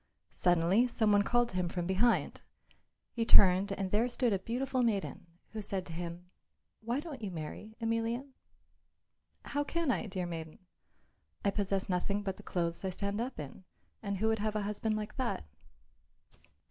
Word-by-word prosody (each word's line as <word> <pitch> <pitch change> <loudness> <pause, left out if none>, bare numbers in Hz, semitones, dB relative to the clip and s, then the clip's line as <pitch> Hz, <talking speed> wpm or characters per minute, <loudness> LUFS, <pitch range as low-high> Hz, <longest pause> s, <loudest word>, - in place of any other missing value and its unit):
Suddenly 175 +7 +4
some 220 -3 +2
one 205 0 +6
called 240 +3 +2
to - - -8
him 180 -1 0
from 175 0 -2
behind. 195 +6 +2 0.7
He 230 - -1
turned, 195 -2 +7
and 195 -1 -3
there 220 +4 +3
stood 240 -2 +3
a 195 - +1
beautiful 255 +5 -1
maiden, 205 -6 -1 0.2
who 220 - -4
said 195 -2 -2
to 165 - -7
him, 170 +1 -5 0.5
"Why 235 +4 -1
don't 295 -5 -7
you 205 - -3
marry, 175 +6 -7
Emelian?" 230 +4 -1 1.1
"How 290 - 0
can 330 -1 0
I, 230 - -1
dear 185 -2 -3
maiden? 165 -2 -6 0.9
I 200 - +4
possess 195 -1 -1
nothing 200 +3 0
but 195 -2 -3
the - - -10
clothes 170 -1 -2
I 190 - 0
stand 200 +3 -2
up 250 -4 -4
in, 150 +5 -8 0.4
and 200 -2 -2
who 220 +4 +1
would 220 -1 +1
have 215 0 -1
a 210 - 0
husband 210 +1 -1
like 210 0 -5
that?" 250 - -1
205 Hz, 170 wpm, -32 LUFS, 185-230 Hz, 1.1 s, turned